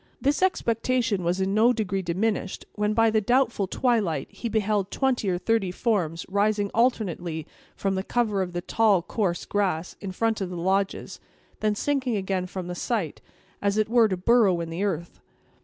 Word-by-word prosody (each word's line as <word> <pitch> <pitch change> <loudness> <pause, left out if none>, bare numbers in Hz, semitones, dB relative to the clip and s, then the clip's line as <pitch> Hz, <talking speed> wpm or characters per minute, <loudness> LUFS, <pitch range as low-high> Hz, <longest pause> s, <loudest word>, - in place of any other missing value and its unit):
This 285 +4 +1
expectation 235 - +1
was 175 +2 0
in 190 +1 0
no 225 +4 +5
degree 195 -4 -1
diminished, 190 +3 -2
when, 210 0 0
by 225 0 +4
the 220 0 +2
doubtful 235 -2 +2
twilight, 220 -7 0
he 235 - -5
beheld 210 -2 0
twenty 255 -7 0
or 180 - +1
thirty 220 0 +1
forms 180 -5 -1
rising 205 +1 +1
alternately 180 -9 0 0.3
from 195 -1 -1
the 190 - -1
cover 215 -3 0
of 180 -1 -3
the 175 - -2
tall, 205 -2 +2
coarse 185 -5 -1
grass, 185 -5 -1
in 195 -2 -4
front 225 +3 0
of 190 - -2
the 180 - -6
lodges, 190 +3 -1
and - - -34
then 215 -1 +1
sinking 260 -1 0
again 190 -2 -1
from 185 -1 -6
the 180 - -4
sight, 180 - -2 0.4
as 200 0 +1
it 215 0 +1
were 235 -1 +5
to 190 -3 -2
burrow 200 -2 +4
in 165 -1 -4
the 175 +4 -2
earth. 170 -4 -3
205 Hz, 185 wpm, -26 LUFS, 185-225 Hz, 0.4 s, no